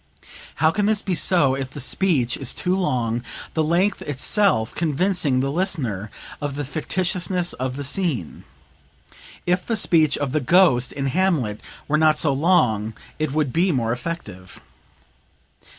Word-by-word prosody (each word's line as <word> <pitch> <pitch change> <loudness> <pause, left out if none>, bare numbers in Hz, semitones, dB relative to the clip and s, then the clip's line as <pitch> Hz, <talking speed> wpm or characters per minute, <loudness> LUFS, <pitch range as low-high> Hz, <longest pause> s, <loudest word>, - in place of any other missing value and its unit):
How 160 +2 +3
can 205 +2 0
this 215 -1 +1
be 190 - -1
so 160 -6 +3
if 135 -1 -3
the 145 - -9
speech 140 -3 +1
is 135 -3 -2
too 180 0 0
long 120 -10 -1 0.3
the 160 - +1
length 180 +6 +1
itself 145 - +1
convincing 160 -3 +1
the 135 +1 -1
listener 135 - -2 0.3
of 145 -1 -3
the 145 - -3
fictitiousness 180 +4 -2
of 130 0 -2
the 145 - -5
scene? 140 - -2 1.0
If 180 +1 +1
the 230 - -1
speech 155 -7 +3
of 145 -2 -2
the 155 +1 0
'Ghost' 135 -4 +4
in 135 -1 -4
'Hamlet' 140 - 0 0.3
were 150 +1 +2
not 155 -1 +4
so 145 -3 +2
long 125 - +2 0.2
it 155 -3 -1
would 145 -3 0
be 180 +3 +2
more 120 -6 0
effective." 115 - -6
150 Hz, 150 wpm, -22 LUFS, 130-180 Hz, 1.0 s, Ghost